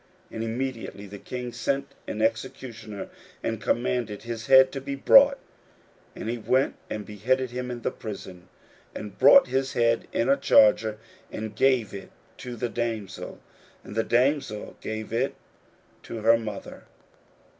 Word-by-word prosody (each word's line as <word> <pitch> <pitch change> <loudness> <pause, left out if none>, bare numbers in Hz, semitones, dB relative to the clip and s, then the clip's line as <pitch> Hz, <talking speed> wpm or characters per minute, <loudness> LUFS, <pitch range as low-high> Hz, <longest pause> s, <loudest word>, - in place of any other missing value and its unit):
41:006:027 - - -11
And 110 - -3
immediately 115 -3 -4
the 100 0 -10
king 125 +1 -6
sent 140 0 -2
an 110 - -4
executioner, 115 -2 -3 0.3
and 115 -1 -2
commanded 120 -3 -1
his 115 -1 -6
head 130 0 +7
to 135 - -5
be 140 +1 -4
brought: 275 - +7 0.8
and - - -6
he 120 +1 -2
went 130 +4 +2 0.2
and 105 -1 -4
beheaded 125 +5 -1
him 125 0 -4
in 120 -2 -6
the - - 0
prison, 95 -4 -9 0.5
41:006:028 - - -4
And 105 -2 -10
brought 275 - +8
his 135 0 0
head 115 -1 +2
in 115 - 0
a 140 +1 +4
charger, 110 0 +4 0.3
and 110 -1 -6
gave 130 -4 +2
it 100 - -8 0.3
to 125 -1 -7
the 120 +1 -2
damsel: 110 -4 -4 0.4
and - - -10
the 115 - +2
damsel 125 -3 0
gave 110 0 -5
it 125 +4 0 0.7
to 115 - -7
her 115 +1 +6
mother. 110 -3 -6
115 Hz, 155 wpm, -26 LUFS, 110-130 Hz, 0.8 s, brought